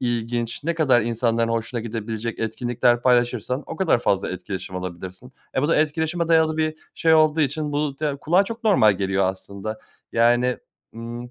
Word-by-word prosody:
ilginç, 120 0 -2
ne 170 +1 0
kadar 135 -7 +3
insanların 115 0 0
hoşuna 115 +1 -2
gidebilecek 115 0 -5
etkinlikler 120 +1 0
paylaşırsan, 125 +1 +1
o - - -7
kadar 185 -9 +2
fazla 100 -5 0
etkileşim 95 0 -6
alabilirsin. 90 +6 -7 0.2
E, 130 - +2
bu 145 - +1
da 165 - +3
etkileşime 160 +2 0
dayalı 160 -1 +3
bir 155 0 0 0.2
şey 160 -1 +3
olduğu 155 0 +4
için 150 +1 -1
bu 145 -1 -2
da 150 -2 -1
kulağa 175 +7 +2
çok 230 +3 -7
normal 150 - +5
geliyor 95 0 0
aslında, 100 +3 -5 0.3
yani, 120 +2 +3 0.4
ımm, 120 +1 -7
120 Hz, 165 wpm, -23 LUFS, 110-150 Hz, 0.4 s, normal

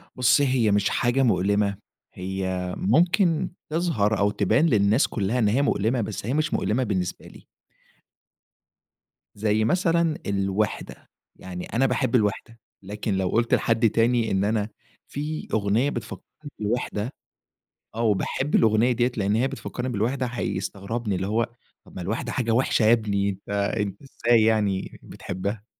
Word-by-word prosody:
بُصّي، 125 +3 +4
هي 120 -5 +2
مش 100 0 +2
حاجة 120 +3 +1
مؤلِمة، 100 -2 +1 0.4
هي 95 -1 -3
ممكن 170 - +2 0.2
تظهر 150 - +1
أو 100 +1 +2
تبان 110 - +2
للناس 110 -3 +3
كُلّها 110 +3 -1
إن 110 - +3
هي 115 +7 +2
مؤلِمة 120 -2 +1
بس 105 -2 -5
هي 120 - -1
مش 155 +2 0
مؤلِمة 120 +5 0
بالنسبة 95 -6 -3
لي. - - -16 1.9
زي 110 +1 +1
مثلًا 170 - +2
الوِحدة. 100 +1 -2 0.3
يعني 90 -1 -7
أنا 125 +4 0
باحب 125 -1 0
الوِحدة، 115 +1 -1 0.2
لكن 105 +1 -3
لو 95 -1 0
قُلت 115 +4 +1
لحد 115 -1 +3
تاني 115 +1 +2
إن 95 0 +1
أنا 105 0 0 0.4
في 150 +2 -5
أغنية 110 +6 +2
بتفكّرني 115 -5 -6 0.3
بالوِحدة، 110 +1 -2 0.8
آه 115 - -2
وباحب 115 +6 0
الأغنية 110 +2 +4
دِيَّة 120 +1 +1
لأن 100 0 +1
هي 120 +4 +2
بتفكّرني 130 -1 -5
بالوِحدة، 125 +4 -1
هيستغربني. 105 -1 -3
اللي 95 +1 -2
هو، 115 +3 +1 0.4
طَب - - -17
ما 95 - -5
الوِحدة 100 +6 -3
حاجة 115 -3 -1
وِحشة 115 0 +2
يا 110 - +5
ابني، 100 -3 0
أنت 100 0 -8
أنت 100 -1 -1
إزاي 120 -4 +2
يعني 105 -4 0
بتحبها؟! 100 +3 -5
110 Hz, 145 wpm, -25 LUFS, 100-125 Hz, 1.9 s, يا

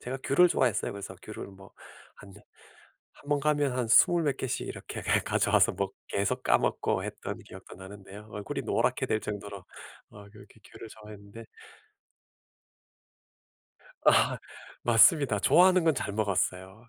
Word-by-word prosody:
제가 130 +2 -6
귤을 180 +6 +5
좋아했어요. 125 - 0
그래서 100 -1 -8
귤을 110 - -8
뭐 95 0 -15 0.5
한 100 -1 -14 0.8
1 145 - -18
번 145 -1 +1
가면 145 -2 +1
한 120 - -2
20 170 +9 +5
몇 140 -3 0
개씩 130 - -3
이렇게 - - -7 0.2
가져와서 - - +2
먹 95 -1 -3 0.2
계속 100 0 -2
까먹고 - - 0
했던 - - -6
기억도 - - -13
나는데요. 100 +2 -12
얼굴이 105 -1 -5
노랗게 - - 0
될 110 - -1
정도로 100 -3 -7 0.5
어 100 -1 -14
그렇게 105 0 -17
귤을 115 - -11
좋아했는데 105 +1 -13 2.6
아 - - +4 0.5
맞습니다. 120 +1 +4
좋아하는 185 - +4
건 160 - +3
잘 100 -6 -4
먹었어요. 95 +1 -3
105 Hz, 290 characters per minute, -28 LUFS, 100-135 Hz, 2.6 s, 귤을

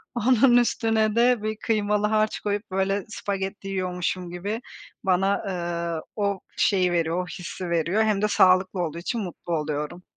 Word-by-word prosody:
onun 245 +1 +5
üstüne 225 -2 +2
de 240 -2 +3
bir 215 0 -2
kıymalı 210 -2 +1
harç 215 0 +1
koyup, 205 -1 -3
böyle, 195 +1 0
spagetti 195 -1 -4
yiyormuşum 180 -1 -2
gibi 205 +7 -4 0.4
bana, 195 +1 +2
eee, 170 -2 -3
o 200 -2 0 0.2
şeyi 185 -3 +3
veriyor, 170 +1 0
o - - -10
hissi 180 -1 -6
veriyor 170 +6 +2
hem 210 -2 +1
de 210 - +3
sağlıklı 185 -2 +4
olduğu 160 0 -4
için 220 +6 -3
mutlu 175 -2 -5
oluyorum. 150 +3 -4
195 Hz, 155 wpm, -25 LUFS, 180-215 Hz, 0.4 s, onun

